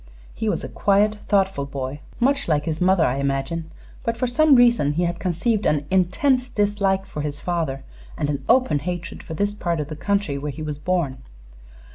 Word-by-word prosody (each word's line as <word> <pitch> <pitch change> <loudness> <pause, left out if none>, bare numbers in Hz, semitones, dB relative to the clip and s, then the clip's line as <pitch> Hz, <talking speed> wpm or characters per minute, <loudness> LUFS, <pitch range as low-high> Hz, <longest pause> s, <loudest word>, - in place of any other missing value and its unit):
He - - -2
was - - -1
a - - -4
quiet, 210 +1 +2
thoughtful 195 -8 +1
boy; 135 +1 -5 0.2
much 275 +3 +2
like 150 -3 +1
his 160 0 -3
mother, 180 -2 +4
I 125 - 0
imagine; 140 +4 -2 0.3
but 230 0 -1
for 255 - 0
some 285 +4 +4
reason 235 - +4
he 170 +4 0
had 175 0 -1
conceived 200 +5 0
an 150 -1 +1
intense 250 +8 +2
dislike 200 -3 +1
for 150 - -6
his 145 -1 -4
father 160 -6 -2 0.3
and - - -1
an 140 -2 -2
open 250 - +4
hatred 175 +3 -5
for 160 - -7
this 205 +4 0
part 170 -5 -2
of 150 0 -3
the 155 - -5
country, 200 -5 -1
where 150 +1 -4
he 155 +3 -7
was 150 -1 -4
born. 155 -6 -1
175 Hz, 195 wpm, -23 LUFS, 150-205 Hz, 0.3 s, mother